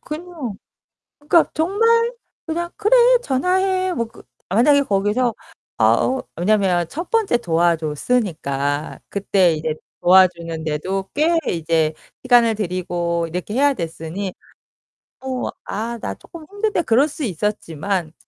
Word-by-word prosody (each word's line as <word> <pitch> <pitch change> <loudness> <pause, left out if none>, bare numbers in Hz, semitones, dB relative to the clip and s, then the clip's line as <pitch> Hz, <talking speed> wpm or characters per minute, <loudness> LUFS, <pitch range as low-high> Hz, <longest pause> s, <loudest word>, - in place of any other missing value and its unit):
그냥 305 - -6 0.6
그니까 315 +3 +3
정말 455 +8 +2 0.3
그냥 345 +2 -3
"그래 430 +4 +3 0.3
전화해." 370 - +1
뭐 230 -5 -2
그 - - -16 0.3
만약에 280 +9 +4
거기서 210 +3 0 0.4
아 - - +5
어 260 0 -1
왜냐면 185 -2 +2
첫 335 - -6
번째 435 - +2
도와줬으니까 160 - -1
그때 190 -4 +2
이제 155 0 -2 0.3
도와주는 175 -3 +3
데도 185 +6 -2
꽤 325 +3 +3
이제 160 -1 0 0.3
시간을 240 -3 +4
들이고 175 -3 -2
이렇게 180 +6 -5
해야 285 +2 +4
됐으니 170 +1 -5 0.9
뭐 260 -1 -3
"아 230 +4 -4
나 - - -3
쪼끔 330 -3 -13
힘든데." 410 -3 -1
그럴 265 +4 +3
수 295 0 -7
있었지만 185 - -2
210 Hz, 255 characters per minute, -20 LUFS, -, 0.9 s, 아